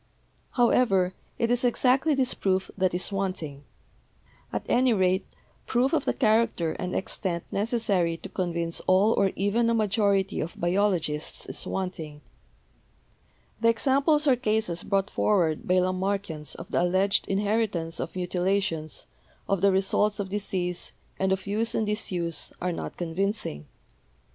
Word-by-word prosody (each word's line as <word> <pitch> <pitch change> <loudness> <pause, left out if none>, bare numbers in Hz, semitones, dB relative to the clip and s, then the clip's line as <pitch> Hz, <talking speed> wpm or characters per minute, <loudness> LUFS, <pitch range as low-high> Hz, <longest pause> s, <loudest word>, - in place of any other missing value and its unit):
"However, 230 -7 +3 0.2
it 230 0 +1
is 245 0 +2
exactly 260 +5 +3
this 265 -2 +1
proof 190 -1 0
that 185 -2 +1
is 180 - 0
wanting. 185 -8 -3 0.9
At - - -3
any 250 0 +3
rate, 190 -1 +1 0.4
proof 255 +5 +2
of 315 - +1
the - - +1
character 220 - +2
and 180 - -3
extent 175 -3 -2
necessary 200 -6 0
to - - -8
convince 170 -2 -2
all 195 +4 +5
or 195 -1 +2
even 215 +5 +1
a 230 - +2
majority 205 -2 +1
of 160 - -5
biologists 175 -4 0
is - - -3
wanting. 165 -6 -4 1.4
The 230 - +4
examples 280 +6 +2
or 270 -3 +5
cases 215 -7 0
brought 195 0 0
forward 170 -7 +1
by 180 - +3
Lamarckians 185 -3 -1
of 170 - -10
the - - +2
alleged 185 +3 +2
inheritance 195 -4 -1
of - - -4
mutilations, 180 -3 -1 0.4
of 195 -3 0
the 200 0 +5
results 195 +2 +1
of 195 -2 -3
disease, 185 -3 -2 0.3
and 190 0 +1
of 190 0 -1
use 215 +3 -1
and 220 - +1
disuse, 180 -6 -2
are 180 0 -1
not 170 - -6
convincing. 175 - -2
195 Hz, 140 wpm, -27 LUFS, 180-220 Hz, 1.4 s, all